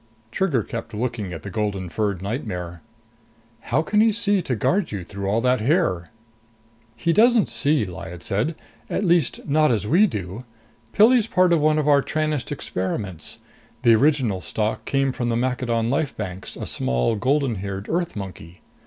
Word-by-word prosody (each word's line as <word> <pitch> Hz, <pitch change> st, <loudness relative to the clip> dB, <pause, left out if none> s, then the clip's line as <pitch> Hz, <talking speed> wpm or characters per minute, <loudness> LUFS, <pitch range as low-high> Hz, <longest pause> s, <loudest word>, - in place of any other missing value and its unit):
Trigger 145 Hz, -, +1 dB
kept 115 Hz, 0 st, -6 dB
looking 110 Hz, -4 st, -3 dB
at 80 Hz, -, -7 dB
the 100 Hz, -, -6 dB
golden 100 Hz, -3 st, -2 dB
furred 100 Hz, 0 st, -2 dB
nightmare. 90 Hz, -, -4 dB, 0.8 s
"How 135 Hz, +7 st, 0 dB
can 210 Hz, +5 st, +2 dB
he 225 Hz, 0 st, +5 dB
see 205 Hz, -3 st, +2 dB
to 130 Hz, -6 st, -2 dB
guard 180 Hz, -, 0 dB
you 100 Hz, -4 st, -4 dB
through 100 Hz, +2 st, -6 dB
all 110 Hz, +4 st, +1 dB
that 125 Hz, -1 st, +2 dB
hair?" 115 Hz, -, +1 dB, 0.9 s
"He 165 Hz, +8 st, 0 dB
doesn't 230 Hz, +2 st, +4 dB
see," 145 Hz, -6 st, +1 dB
Lyad 90 Hz, -1 st, -8 dB
said. 110 Hz, +12 st, -1 dB, 0.3 s
"At -, -, -1 dB
least 170 Hz, -6 st, +1 dB
not 150 Hz, +1 st, +3 dB
as 105 Hz, -3 st, 0 dB
we 180 Hz, -, +4 dB
do. 100 Hz, -, -5 dB, 0.5 s
Pilli's 225 Hz, +1 st, +5 dB
part 185 Hz, -4 st, +3 dB
of 165 Hz, -, +4 dB
one 155 Hz, +1 st, +3 dB
of 150 Hz, -1 st, 0 dB
our 145 Hz, -1 st, +5 dB
Tranest 155 Hz, -2 st, -2 dB
experiments 95 Hz, -, -4 dB, 0.5 s
the 115 Hz, -, +6 dB
original 125 Hz, -6 st, +2 dB
stock 110 Hz, +3 st, -2 dB
came 135 Hz, -1 st, +1 dB
from 120 Hz, -2 st, -2 dB
the 115 Hz, -, +1 dB
Maccadon 120 Hz, -2 st, 0 dB
life 145 Hz, 0 st, -1 dB
banks, 95 Hz, -3 st, -5 dB
a -, -, -5 dB
small 65 Hz, -, 0 dB
golden 130 Hz, +1 st, +1 dB
haired 100 Hz, +1 st, -5 dB
Earth 175 Hz, 0 st, -1 dB
monkey. 90 Hz, -4 st, -8 dB
120 Hz, 170 wpm, -23 LUFS, 100-155 Hz, 0.9 s, the